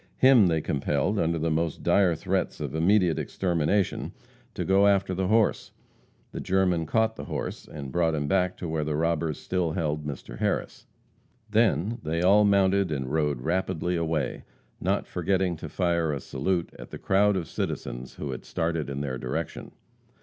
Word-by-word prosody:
Him 130 -7 +6
they 80 -2 +1
compelled, 75 +8 0
under 85 0 +1
the 80 +1 -1
most 80 0 -1
dire 95 -4 +3
threats - - -2
of - - -4
immediate 90 +1 +3
extermination, 90 +2 0 0.4
to - - -2
go 100 +1 +4
after 100 -2 +2
the 95 0 -1
horse. 110 +1 +1 0.6
The - - -6
German 90 -3 +1
caught 110 +2 +1
the - - -6
horse - - -5
and 70 -3 -7
brought 85 -1 +1
him 75 -1 -2
back 90 +1 +1
to 90 - -5
where 80 -1 -1
the 75 0 -2
robbers 80 -1 0
still 90 -4 -1
held 75 -3 -1
Mr. 65 -4 -7
Harris. - - -2 0.6
Then 110 - +2
they 80 +2 -1
all 100 +3 +6
mounted 100 -2 +3
and 65 -2 -3
rode 75 -5 0
rapidly 90 +2 -1
away, 80 -3 -1 0.4
not - - 0
forgetting 95 -2 0
to - - -7
fire 85 -3 0
a 70 - -2
salute 85 +7 -2
at - - -9
the - - -7
crowd 100 +1 +2
of 85 -4 -3
citizens 60 +1 -4
who - - -5
had - - -6
started 80 -3 -2
in 70 0 -4
their 65 -3 -3
direction. - - -4
85 Hz, 170 wpm, -27 LUFS, 75-95 Hz, 0.6 s, Him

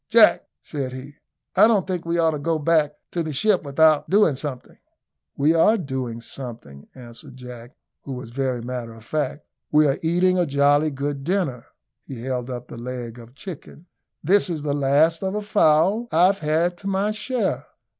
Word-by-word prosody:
"Jack," - - +5 0.2
said 135 -3 -4
he, 135 +3 -9 0.4
"I - - +7
don't 215 -5 +2
think 180 -3 -3
we 170 0 0
ought 165 -1 +3
to 150 - -4
go 160 +3 0
back 150 -1 +1 0.2
to 175 - -1
the 160 -1 -3
ship 190 +7 +2
without 155 +1 +3
doing 200 -5 +4
something." 135 -2 -7 0.6
"We 150 +3 +3
are 190 +7 +4
doing 130 - -4
a - - -7
good 120 -3 -7
deal," 70 0 -14
answered 120 0 -12
Jack, 125 +1 -11 0.3
who 135 - -7
was 125 -2 -8
very 130 -2 -2
matter 120 -2 -5
of 115 - -14
fact. 150 +1 -3 0.3
"We 150 0 +5
are 135 -1 +1
eating 180 +3 +2
a 175 - +1
jolly 145 +2 +3
good 140 0 -4
dinner." 165 -8 -1 0.4
He 125 -4 -9
held 125 -1 -3
up 125 -1 -6
the 115 - -9
leg 120 -1 -6
of 115 -1 -12
a - - -25
chicken. 165 +1 -10 0.4
"This 190 +5 +3
is 160 -4 -3
the 145 -1 -1
last 145 +4 +2
of 190 +1 -2
a 210 - -1
fowl 200 +2 +3
I've 185 +4 +4
had 160 +3 0
to 195 - -7
my 195 +2 0
share." 235 +3 -2
150 Hz, 195 wpm, -23 LUFS, 130-170 Hz, 0.6 s, I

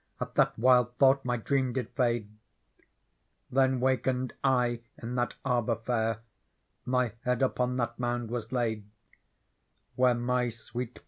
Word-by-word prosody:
At - - -4
that - - +2
wild 125 0 +4
thought 135 0 +5
my 125 -1 0
dreamjid 130 -1 -1
fade. 120 -4 0 1.3
Th«n 130 -1 +3
wakened 130 0 0
I 125 -3 +2 0.2
in 120 +1 -5
lliat 120 -1 -1
Arbour 120 -2 +1
fair. 115 -1 -1 0.6
My 125 -2 +1
head 125 +1 +1
upon 125 -1 0
that 120 -1 -2
Mouud 120 -1 -2
was 115 -2 -4
laid 110 -5 -1 1.1
Where 125 -1 +4
my 125 +1 0
swe, 120 +2 -5
et. 120 - -16
125 Hz, 135 wpm, -29 LUFS, 120-125 Hz, 1.3 s, thought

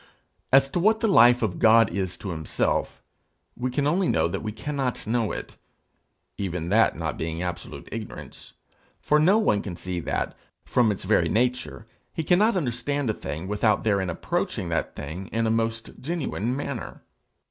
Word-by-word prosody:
As 135 +1 +6
to 175 - 0
what 215 +5 +3
the 225 - +1
life 125 - +6
of 95 -6 -1
God 115 -2 +6
is 95 -1 -2
to 100 - -5
himself, 80 -2 -1 0.5
we 125 +1 -2
can 140 +3 -1
only 175 +5 +2
know 80 +1 +2
that 85 - -4
we 110 - -3
cannot 135 +2 -3
know 115 -1 0
it - - -7 0.8
even 90 -4 -3
that 110 +3 +3
not 80 -2 -3
being 80 +2 -3
absolute 90 -1 -6
ignorance, - - -8 0.5
for 150 - +2
no 185 +7 +5
one 110 - +2
can 95 -4 -6
see 90 +1 -4
that, - - -2 0.3
from 120 -4 +3
its 100 - -5
very - - +2
nature, 125 0 -1 0.3
he 160 - -3
cannot 200 +8 +3
understand 140 -3 -1
a - - -3
thing 80 0 -6
without 105 +1 +1
therein 100 -4 +1
approaching 85 +1 -2
that 85 -2 -2
thing 80 +7 -6
in 115 0 -1
a 110 - +2
most 115 0 -1
genuine 135 - -2
manner. 145 - -5
115 Hz, 170 wpm, -25 LUFS, 90-135 Hz, 0.8 s, As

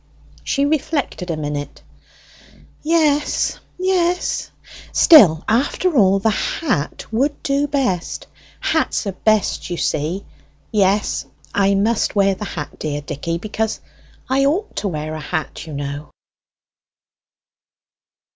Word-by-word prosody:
She 280 - +1
reflected 285 - -1
a 165 - -1
minute. 145 -2 -5 1.0
"Yes; 305 -2 +1 0.2
yes. 360 -1 0 0.4
Still, 185 - +7
after 285 +9 +1
all, 195 -5 +5
the 215 +3 +2
hat 215 - -2
would 275 +6 0
do 280 +1 +1
best; 260 - -1 0.3
hats - - 0
are 200 - -1
best, 210 0 +1
you 175 - -3
see. 165 +7 -1 0.5
Yes, 205 -1 +1 0.3
I 200 0 +3
must 215 +3 +1
wear 195 -1 +4
the 210 +2 -6
hat, 150 -7 -6
dear 145 -1 -3
Dicky, 150 +3 -3
because 215 +3 -2 0.5
I 270 +1 +2
ought 365 +10 0
to 210 - -1
wear 155 -3 -3
a 155 - -5
hat, 160 0 -4
you 155 - -7
know." 145 +1 -5
200 Hz, 120 wpm, -20 LUFS, -, 1.0 s, Still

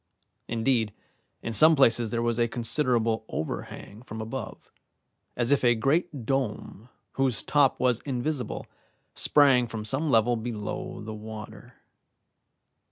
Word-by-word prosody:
Indeed, 115 -2 0 0.5
in 115 - -3
some 155 +8 +7
places 120 -4 +3
there 115 +1 -1
was 120 0 0
a 120 - +3
considerable 115 -1 0
overhang 100 +6 -6
from 110 -3 -9
above, 110 +1 -7 0.7
as 120 +2 +1
if 145 - +3
a 120 -1 +4
great 140 +2 0
dome 125 -3 -3 0.2
whose 135 -4 0
top 145 -3 +2
was 125 -2 +2
invisible 135 0 -3 0.5
sprang 135 -5 +4
from 110 -2 -6
some 140 +8 0
level 120 -1 +3
below 110 -3 -5
the 110 +1 -6
water. 110 +2 -10
120 Hz, 125 wpm, -27 LUFS, 110-135 Hz, 0.7 s, some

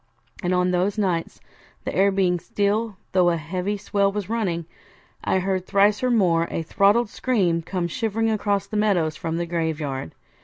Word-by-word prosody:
And 180 - -1
on 180 0 +2
those 185 +4 0
nights, 180 -5 -1 0.5
the - - -3
air 195 +2 +4
being 185 -2 +1
still 205 +4 -1
though 180 -2 +4
a 170 - +1
heavy 180 +6 -3
swell 200 0 +1
was 205 -1 -4
running, 185 -8 -1 0.6
I - - +1
heard 185 0 -1
thrice 205 +1 +3
or 255 - +1
more 175 -8 +3
a 165 - -3
throttled 205 +6 +3
scream 185 -10 +1
come 175 +1 -2
shivering 225 +3 -1
across 205 -2 0
the 210 +1 -4
meadows 180 -7 +2
from 165 +1 -3
the 170 - -1
graveyard. 155 - -3
190 Hz, 170 wpm, -23 LUFS, 170-205 Hz, 0.6 s, air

